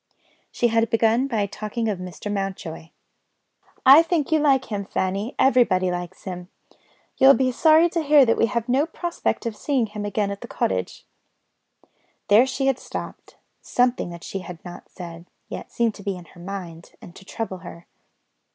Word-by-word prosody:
She 240 - +1
had 225 0 +2
begun 225 +3 +2
by 220 -6 0
talking 215 +3 -4
of 205 -4 -2
Mr. 185 +3 -6
Mountjoy: 190 -5 -5 1.0
"I 275 +4 +10
think 330 -3 -1
you 315 - +4
like 270 -5 +2
him, 200 -1 -2
Fanny: 195 +4 -2
everybody 230 -9 +3
likes 175 -1 -6
him. 180 -1 -7 0.7
You 265 - +6
will 275 - +10
be 260 -1 +1
sorry 315 +5 +5
to 335 - 0
hear 295 -2 +6
that 230 - +3
we 230 - +2
have 235 +2 -2
no 270 +5 +2
prospect 345 -5 -3
of 230 -2 -3
seeing 265 0 0
him 210 -1 -7
again 205 0 -1
at 200 - -7
the - - -8
cottage." 95 -1 -2 1.2
There 220 +6 +6
she 265 +1 -2
had 270 -2 +1
stopped; - - -8 0.2
something 245 -6 +1
that 170 0 -10
she 195 - -5
had 180 -1 -9
not 175 - -10
said, 170 -1 -10 0.2
yet, - - -7
seemed 235 -2 +1
to 200 - -12
be 195 -2 -3
in 175 - -12
her 175 - -16
mind, 175 -3 -8
and 175 - -13
to - - -13
trouble 190 -1 -5
her. 170 -1 -11
210 Hz, 180 wpm, -23 LUFS, 185-260 Hz, 1.2 s, I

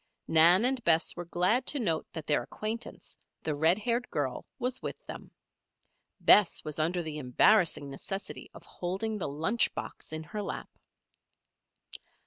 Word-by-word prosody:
Nan 170 +7 +6
and 260 -1 +1
Bess 165 0 +2
were 175 - -6
glad 180 +9 +1
to 290 - +2
note 165 -9 -1
that 160 -2 -6
their 145 - +1
acquaintance, 225 +3 -6 0.3
the 155 - -1
red 160 +5 +3
haired 235 +3 -2
girl, 135 -4 -3
was 250 +1 -3
with - - -4
them. - - -9 0.9
Bess 205 -4 +5
was 155 0 -5
under 170 +3 0
the 155 -1 -5
embarrassing 150 - +3
necessity 195 +8 -6
of - - -12
holding 195 +5 -4
the - - -2
lunch 165 +11 +1
box - - -7
in 155 0 -4
her 210 +6 -6
lap. - - -6
175 Hz, 150 wpm, -29 LUFS, 155-215 Hz, 0.9 s, Nan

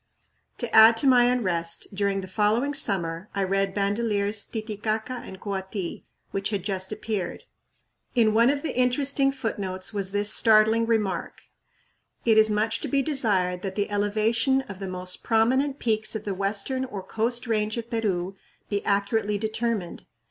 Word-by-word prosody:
" - - -45
To 240 -3 -3
add 225 +1 +8
to 275 - +3
my 250 -2 +6
unrest, 185 -9 -1
during 195 0 -1
the 185 - -8
following 220 +8 +1
summer 185 - 0
I 200 - 0
read 195 0 0
Bandelier's 205 0 0
"Titicaca 220 +2 -3
and 190 - -10
Koati," 190 -2 -5 0.3
which 195 0 -2
had 200 -4 -3
just 190 -1 -2
appeared. 210 -4 -4 0.7
In 225 -3 +3
one 230 +3 +4
of 285 0 -1
the 320 - -3
interesting 270 +2 +2
footnotes 200 -7 -3
was 195 -2 -1
this 205 +1 +4
startling 220 +1 +4
remark: 210 -6 -1 0.8
"It 220 -2 +5
is 215 0 +5
much 220 +2 0
to - - -3
be 275 -1 +1
desired 200 -12 0
that 190 -1 -5
the 205 0 -2
elevation 220 +5 +1
of 200 -7 -10
the 195 - -5
most 180 0 -4
prominent 260 +5 +1
peaks 220 -3 0
of 220 - -5
the 200 - -2
western 200 +7 -1
or 205 -7 -7
coast 235 +4 -2
range 215 -1 -1
of 230 +1 -6
Peru 195 -5 -1 0.3
be 205 -1 -2
accurately 205 +1 0
determined. 220 -3 -3
215 Hz, 165 wpm, -25 LUFS, 195-230 Hz, 0.8 s, add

